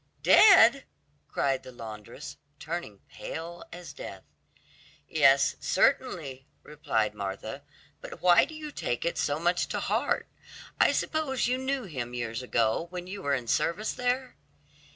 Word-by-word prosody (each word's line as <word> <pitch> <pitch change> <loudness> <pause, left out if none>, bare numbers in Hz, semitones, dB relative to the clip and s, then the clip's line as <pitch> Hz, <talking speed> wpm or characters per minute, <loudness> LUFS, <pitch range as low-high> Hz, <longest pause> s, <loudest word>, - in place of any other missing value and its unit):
"Dead!" 275 - +7 0.4
cried 135 -1 0
the 130 - -11
laundress, 115 +3 -9 0.2
turning 150 - -6
pale 170 +1 -7
as 175 +1 -9
death. - - -9 0.8
"Yes, - - +4
certainly," 155 - 0 0.2
replied 115 -8 -1
Martha; 100 -2 -5 0.4
"but - - -9
why 175 -1 +6
do 315 +2 -11
you 305 -1 -7
take 120 - -3
it 170 - -1
so 145 - 0
much 175 +2 +1
to - - -3
heart? - - 0 0.5
I - - +5
suppose 280 -6 -1
you 255 +1 0
knew 265 0 -2
him 130 - -5
years 120 0 -3
ago, 115 +4 0
when 180 0 -6
you 195 +2 -7
were 140 -5 +1
in 125 -2 -4
service 190 - 0
there?" 250 +1 -2
170 Hz, 140 wpm, -28 LUFS, -, 0.8 s, Dead